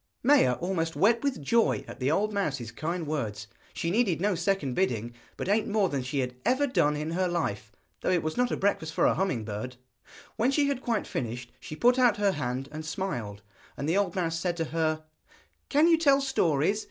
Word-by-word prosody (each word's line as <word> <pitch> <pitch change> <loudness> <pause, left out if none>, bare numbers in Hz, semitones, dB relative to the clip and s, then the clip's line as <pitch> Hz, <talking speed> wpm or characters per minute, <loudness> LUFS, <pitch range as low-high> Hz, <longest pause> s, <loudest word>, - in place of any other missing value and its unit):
Maia 265 - +5
almost 165 +1 -2
wept 230 +6 +3
with 275 - -1
joy 230 +10 +2
at - - -9
the 130 +1 +1
old 210 +7 +1
mouse's 140 - -2
kind 165 +2 -3
words. 110 -9 -3 0.3
She 165 - -2
needed 195 -6 +2
no 205 +3 +1
second 180 -6 0
bidding, 120 - -1 0.2
but - - -4
ate 210 +2 +2
more 205 -3 +2
than 140 -2 -2
she 135 +2 -2
had 125 -1 -3
ever 260 +3 +2
done 150 - +2
in 155 +2 -3
her 185 +2 +1
life, 110 - -2 0.3
though - - -2
it 180 -3 +2
was 155 0 -2
not 250 0 +2
a - - -2
breakfast 160 -5 -1
for - - +3
a - - +4
humming 175 - -1
bird! 110 +4 -5 0.6
When 235 +4 +2
she 285 +1 +2
had 270 -2 -2
quite 230 -5 -1
finished 120 0 -4
she 155 - -8
put 245 +8 +3
out 245 -4 +4
her 205 -1 +2
hand 130 -3 -3
and 155 +1 -6
smiled, 140 - -4 0.3
and 140 - -3
the 165 - +1
old 200 -4 0
mouse 165 -3 -1
said 175 0 -1
to 165 - -1
her: 155 -1 0 0.7
'Can 300 +3 +4
you 330 -1 +5
tell 280 -4 +5
stories? 200 - +1
170 Hz, 215 wpm, -28 LUFS, 140-210 Hz, 0.7 s, Maia